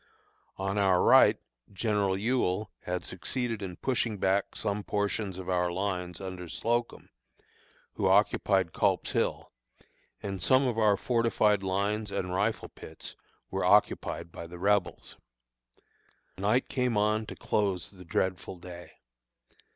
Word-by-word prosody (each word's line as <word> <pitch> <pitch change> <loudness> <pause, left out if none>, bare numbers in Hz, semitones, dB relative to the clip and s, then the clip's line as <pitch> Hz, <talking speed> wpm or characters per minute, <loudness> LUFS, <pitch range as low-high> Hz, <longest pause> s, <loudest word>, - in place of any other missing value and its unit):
On 95 +1 -1
our 95 -2 +4
right - - +6 0.3
General 100 -1 0
Ewell 110 -2 0
had 90 0 -3
succeeded 115 +4 -3
in 90 -3 -5
pushing 120 -3 -1
back 95 +1 0
some 105 0 -2
portions 100 -2 -2
of 95 - -7
our 90 -1 +1
lines 90 -2 -3
under 90 -2 -7
Slocum, 120 +5 -2 0.8
who - - 0
occupied 95 -5 +3
Culp's - - +1
Hill, - - -1 0.7
and 95 -2 -4
some 130 +5 +4
of 120 -3 0
our 105 -2 +4
fortified 115 -4 +2
lines 100 +3 -1
and 90 -1 -2
rifle 105 +4 -1
pits - - -10 0.4
were - - -1
occupied 85 - +2
by 85 - -8
the 90 +1 -10
Rebels. 100 +1 0 1.2
Night 105 +6 +2
came 125 -4 0
on 105 +1 +1
to - - -7
close 100 -4 -1
the 95 -2 -13
dreadful 90 +2 -2
day. 90 0 -11
100 Hz, 130 wpm, -29 LUFS, 90-110 Hz, 1.2 s, right